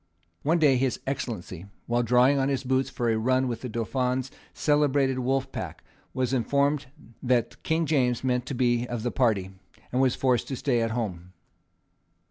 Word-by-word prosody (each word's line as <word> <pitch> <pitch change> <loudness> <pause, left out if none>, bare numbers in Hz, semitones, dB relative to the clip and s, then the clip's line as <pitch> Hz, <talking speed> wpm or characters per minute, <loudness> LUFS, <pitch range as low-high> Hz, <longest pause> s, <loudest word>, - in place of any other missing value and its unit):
One 165 +4 +2
day 145 -5 +4
his 130 0 0
Excellency, 100 -9 -4 0.2
while 120 +1 +1
drawing 125 +3 +4
on 135 +1 +1
his 135 -1 -1
boots 130 +1 +1
for 120 -1 -1
a 110 - +1
run 130 +3 +2
with 115 -2 -4
the 125 - -5
Dauphin's 125 +3 -1 0.2
celebrated 145 -3 +2
wolf 135 +1 -1
pack, - - -6 0.3
was 130 0 -1
informed 140 +3 +1 0.3
that 125 -2 0
King 160 +1 0
James 130 -6 +1
meant 125 -1 0
to 140 - -3
be 120 -1 +1
of 120 -2 -4
the 120 - -1
party, 105 -7 +1 0.4
and 125 - +1
was 130 -2 +3
forced 125 -3 +1
to 135 - -3
stay 130 -2 0
at 115 - 0
home. 95 -6 -4
125 Hz, 175 wpm, -26 LUFS, 120-135 Hz, 0.4 s, day